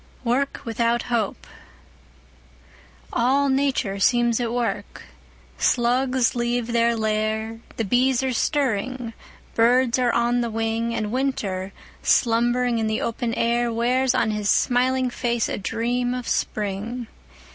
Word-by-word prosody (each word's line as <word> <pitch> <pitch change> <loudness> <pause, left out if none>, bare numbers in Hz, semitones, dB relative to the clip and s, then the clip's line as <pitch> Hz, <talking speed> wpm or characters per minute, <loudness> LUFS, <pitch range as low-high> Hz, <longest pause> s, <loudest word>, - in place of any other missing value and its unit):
Work 255 +3 0
without 235 +1 0
Hope 220 -4 -1 1.7
ALL 275 +4 +2
Nature 265 -7 0
seems 240 +2 +3
at 235 -2 -1
work. 240 -1 -3 0.6
Slugs 250 0 +2
leave 240 0 -1
their 235 0 +3
lair— 220 +1 -1 0.2
The 225 - -1
bees 250 +4 +2
are 260 -1 0
stirring—birds 245 -1 0
are 245 -1 +2
on 240 +1 +1
the 235 - -1
wing— 225 +1 -1
And 210 -1 -2
Winter, 205 -8 -2 0.3
slumbering 240 0 +2
in 220 - 0
the 220 0 0
open 230 0 -2
air, 235 +1 +1
Wears 250 +3 +1
on 220 - +2
his 210 -1 -2
smiling 255 +1 +2
face 235 -1 -1
a - - -3
dream 245 +4 -1
of 250 -1 -5
Spring! 215 +4 -2
235 Hz, 125 wpm, -23 LUFS, 225-250 Hz, 1.7 s, seems